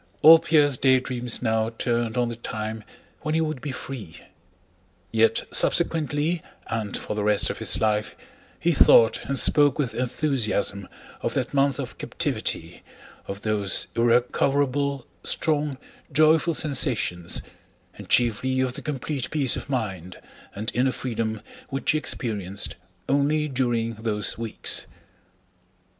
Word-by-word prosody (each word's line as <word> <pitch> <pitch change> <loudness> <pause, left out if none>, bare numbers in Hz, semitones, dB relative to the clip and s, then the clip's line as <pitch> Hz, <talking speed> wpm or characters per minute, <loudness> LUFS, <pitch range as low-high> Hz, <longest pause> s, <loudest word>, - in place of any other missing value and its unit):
All 165 +1 +10
Pierre's 145 -5 +3
daydreams 125 -2 +1
now 110 -1 +1
turned 115 0 -2
on 120 -1 +1
the 115 - -5
time 110 -1 -5 0.4
when 155 0 -2
he 160 - +2
would 155 -5 -3
be 145 - -4
free. 125 -10 -7 1.0
Yet 115 0 +2
subsequently, 160 0 +2 0.2
and 110 -3 -3
for - - -5
the 105 - -2
rest 105 -1 +2
of - - -8
his - - +2
life, 105 -1 0 0.4
he 170 - +1
thought 115 -6 +5
and 140 - -2
spoke 145 -1 +5
with 140 -6 -1
enthusiasm 120 -7 -1 0.3
of - - -3
that - - -2
month 140 -1 +2
of - - -6
captivity, - - -3 0.5
of 100 +1 -7
those 105 -3 +1
irrecoverable, 135 +3 +1 0.2
strong, 150 -3 0 0.3
joyful 155 +2 +3
sensations, 125 - 0 0.5
and - - -12
chiefly 125 +2 +2
of 130 -1 0
the - - -7
complete 140 -2 -3
peace 140 -5 +3
of - - -7
mind 95 -9 -4 0.4
and 110 +4 -3
inner 130 +2 +2
freedom 115 -4 -4 0.3
which 135 0 -1
he 155 - +1
experienced 100 -8 -2 0.3
only 145 +2 +1
during 120 -4 -1
those 110 -1 -2
weeks. 115 -1 -2
125 Hz, 130 wpm, -24 LUFS, 110-145 Hz, 1.0 s, All